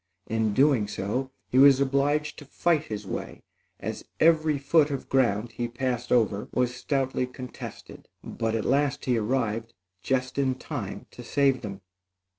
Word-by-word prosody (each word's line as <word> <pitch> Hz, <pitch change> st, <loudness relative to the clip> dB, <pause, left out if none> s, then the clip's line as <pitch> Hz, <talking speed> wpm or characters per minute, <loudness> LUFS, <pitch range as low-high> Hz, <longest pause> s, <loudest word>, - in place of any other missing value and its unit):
In 110 Hz, 0 st, 0 dB
so -, -, -2 dB
doing, 135 Hz, -6 st, +4 dB, 0.6 s
he 130 Hz, -, +3 dB
was 135 Hz, -1 st, +8 dB
obliged 140 Hz, +2 st, +1 dB
to 145 Hz, -, -11 dB
fight 155 Hz, +2 st, +1 dB
his 105 Hz, -4 st, -5 dB
way, -, -, -6 dB, 0.4 s
as -, -, -5 dB, 0.2 s
every 155 Hz, -2 st, +4 dB
foot 145 Hz, +2 st, +3 dB
of 140 Hz, -2 st, -4 dB
ground 120 Hz, -4 st, +2 dB
he 120 Hz, +1 st, -3 dB
passed 125 Hz, 0 st, -3 dB
over 105 Hz, -4 st, +2 dB
was 125 Hz, -1 st, +1 dB
stoutly 130 Hz, -1 st, -1 dB
contested; 125 Hz, -1 st, -9 dB, 0.2 s
but 115 Hz, -1 st, -2 dB
at 110 Hz, -, -2 dB
last 140 Hz, 0 st, +1 dB
he 125 Hz, -3 st, +2 dB
arrived, 115 Hz, 0 st, -1 dB, 0.3 s
just 130 Hz, 0 st, -1 dB
in 130 Hz, -2 st, +1 dB
time 130 Hz, -7 st, -6 dB
to 125 Hz, -, -10 dB
save 135 Hz, +2 st, +2 dB
them. 100 Hz, -3 st, -7 dB
130 Hz, 155 wpm, -27 LUFS, 115-140 Hz, 0.6 s, was